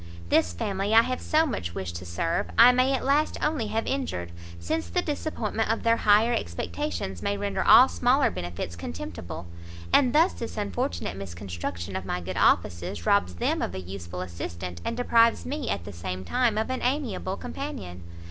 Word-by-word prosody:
This 85 - +3
family 195 - -1
I 230 - +8
have 255 +1 -3
so 315 +1 +3
much 85 - -4
wished 85 -3 -4
to 90 - -9
serve, 130 - -1
I 240 +2 +9
may 255 +2 +3
at 265 - -1
last 290 +3 +2
only 300 -8 0
have 220 +2 -1
injured, 245 - -3 0.3
since 85 -1 -2
the 85 - 0
disappointment 225 -8 -2
of 225 - 0
their 230 0 +4
higher 215 +3 +4
expectations, 85 - -3
may 100 - -1
render 100 -1 -1
all - - +8
smaller 85 -1 +2
benefits 85 -1 -5
contemptible. 85 0 -7 0.5
And 260 -3 +5
thus 325 +7 +4
this 230 - -6
unfortunate 210 - -2
misconstruction 85 -1 -6
of 95 - -3
my 90 - -2
good 90 +1 -6
offices, 85 -1 +1
robs 90 -3 +2
them 85 - 0
of 90 - -3
a - - -3
useful 90 -1 -7
assistant, 85 0 -6
and 230 - -3
deprives 230 -2 +3
me 285 -1 -3
at 85 - -2
the 100 - -8
same 90 +2 -5
time 245 -4 +1
of 220 +3 -1
an 260 - -2
amiable 245 -8 -1
companion." 170 - -6
100 Hz, 180 wpm, -26 LUFS, -, 0.5 s, I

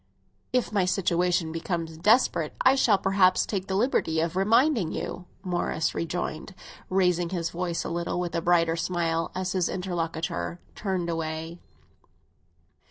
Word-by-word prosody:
"If 250 -4 +1
my 200 -4 +2
situation 180 -3 +1
becomes 165 -1 -3
desperate 175 - +2
I 260 - +6
shall 235 -6 +4
perhaps 190 -1 +3
take 195 -2 -3
the 190 - -1
liberty 195 -8 +1
of 165 +1 -1
reminding 225 - +3
you!" 180 - -5 0.2
Morris 175 -3 -1
rejoined, 170 +2 -4 0.3
raising 180 -2 +2
his 170 -2 -2
voice 170 -1 -2
a - - -4
little, 170 +1 -2
with 175 -1 -3
a 170 - 0
brighter 165 -1 +3
smile, 165 -1 -1
as 185 0 -2
his 185 -3 +1
interlocutor 170 -1 -3
turned 190 -4 -2
away. 165 0 -4
175 Hz, 140 wpm, -27 LUFS, 165-190 Hz, 0.3 s, I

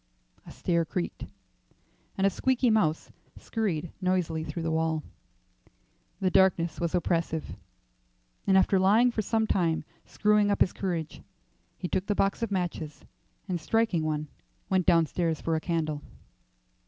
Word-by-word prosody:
A - - -9
stair 170 -1 0
creaked, 175 +2 -4 0.9
and 195 - +2
a 195 - +4
squeaky 255 +2 +2
mouse 165 -8 +1 0.3
scurried 175 -8 -2
noisily 180 -4 0
through 160 +1 -5
the 165 - -1
wall. 160 -1 0 1.2
The 185 -1 +1
darkness 180 -4 +3
was 170 +1 -1
oppressive, 165 -2 -1 0.9
and 190 -1 +5
after 190 0 +4
lying 215 +6 +5
for 225 - -1
some 220 +2 +1
time 170 -7 +1 0.2
screwing 210 -1 +2
up 200 - 0
his - - +4
courage, 170 -5 -3 0.6
he - - -4
took 190 +2 -2
the 205 - +1
box 195 +3 +1
of 230 - -1
matches, 175 -6 -3 0.4
and 180 -4 -2
striking 220 -2 +1
one, 155 -1 -2 0.4
went 185 -2 +2
downstairs 165 0 +2
for 165 - -1
a 160 - -1
candle. 155 -4 -2
175 Hz, 140 wpm, -28 LUFS, 160-200 Hz, 1.2 s, and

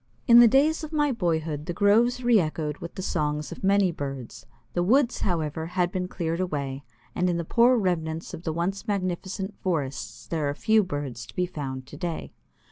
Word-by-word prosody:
In 235 -1 +8
the 240 - +9
days 295 +7 +3
of 310 - -6
my 295 -2 +2
boyhood 160 - -1
the 175 - -2
groves 235 +6 +3
re 240 -3 +5
echoed 155 -3 -2
with 170 - -8
the 190 - -5
songs 150 -4 -1
of - - -9
many 195 -1 +4
birds; 135 -8 -7 0.3
the 175 - +1
woods, 245 +7 +3
however, 160 -3 -1
have 180 0 0
been 180 -1 -2
cleared 165 -2 -3
away, 140 -6 -3 0.3
and 180 0 +1
in 175 - 0
the 170 - -3
poor 240 +7 +4
remnants 165 -5 -2
of - - -6
the 165 - -2
once 185 +7 -2
magnificent 190 0 -2
forests 145 -7 -3
there 155 -4 -1
are 145 - -3
few 220 +6 +3
birds 145 -9 -5
to - - -14
be 180 - +1
found 135 -6 -5
today. 160 +4 -5
175 Hz, 195 wpm, -26 LUFS, 155-200 Hz, 0.3 s, the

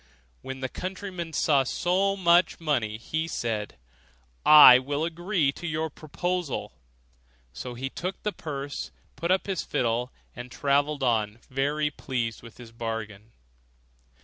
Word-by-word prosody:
When 130 0 -7
the 130 - -1
countryman 185 +1 -6
saw 145 -2 +3
so 185 +8 +1
much 175 -1 +3
money, 125 -10 -1
he 160 +8 -3
said, 110 - -3 0.7
'I 150 -5 +11
will 145 +4 -2
agree 170 -2 0
to 175 +5 -7
your 160 -1 -2
proposal.' 175 +1 -3 0.8
So 120 - -7
he 135 +2 -4
took 185 +2 -5
the 210 - 0
purse, 140 -2 -5 0.3
put 170 - -3
up 185 +1 +2
his 195 -3 -2
fiddle, 120 +1 -1 0.2
and 125 +1 -8
travelled 140 +2 0
on 110 -3 +1
very 145 +3 0
pleased 120 -6 -3
with 115 -1 -13
his 120 -2 -12
bargain. 115 -2 -6
145 Hz, 135 wpm, -27 LUFS, 120-170 Hz, 0.8 s, I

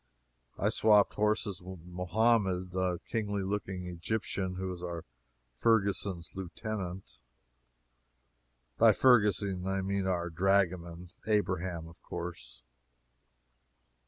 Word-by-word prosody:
I - - +2
swapped 105 -2 +4
horses 105 -3 0
with 90 -2 -10
Mohammed, 95 0 +1
the 90 -1 0
kingly 105 -3 -2
looking 95 -2 -3
Egyptian 90 +1 -3
who 95 0 -3
is 90 - -9
our 85 -2 -5 0.5
Ferguson's 100 - +1
lieutenant. 95 - -6 1.6
By - - +7
Ferguson 100 -6 +3
I 95 0 0
mean 100 0 -1
our 85 -2 -1
dragoman 90 -1 +1 0.2
Abraham, 90 -5 0
of 85 +1 -16
course. 85 -8 -7
95 Hz, 100 wpm, -31 LUFS, 90-100 Hz, 1.6 s, By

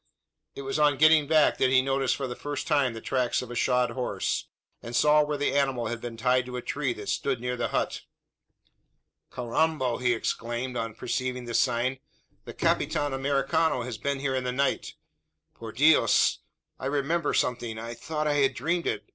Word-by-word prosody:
It 140 - -7
was 135 +3 -2
on 145 -2 +4
getting 155 0 +5
back, 155 -1 +3
that 130 - +3
he 130 0 +5
noticed 135 0 +1
for 140 - -4
the 125 -1 -5
first 145 -1 -5
time 140 -6 +1
the 115 - -7
tracks 125 -1 0
of 125 - -9
a - - -6
shod 125 0 +2
horse; 125 -1 -2 0.3
and 120 +1 -7
saw 150 +4 +5
where 150 0 -2
the 145 - 0
animal 135 -5 0
had 120 -1 -4
been 120 -1 -6
tied 125 +1 +1
to 125 0 -5
a - - -4
tree 140 -3 -2
that 105 -3 -9
stood 125 +6 -1
near 125 +1 -2
the 120 -1 -1
hut. - - -2 1.3
"Carrambo!" 130 +1 0
he 125 -1 +2
exclaimed, 120 +2 -3
on 115 -2 -3
perceiving 125 +1 -3
this 120 -1 0
sign, 125 +1 0 0.5
"the - - -8
Capitan 145 -2 0
Americano 140 +1 +1
has 120 -3 -6
been 140 +4 -2
here 135 -1 -1
in 130 -1 -1
the 125 - -1
night. 135 +2 -1 0.6
Por 115 -1 -9
Dios! 150 +8 +4 0.4
I 130 - -3
remember 145 +4 0
something 120 -2 -1
I 115 +1 -6
thought 155 +6 -4
I 145 -1 +1
had 135 -1 +2
dreamt 170 +7 -1
it. - - -2
130 Hz, 190 wpm, -27 LUFS, 120-145 Hz, 1.3 s, getting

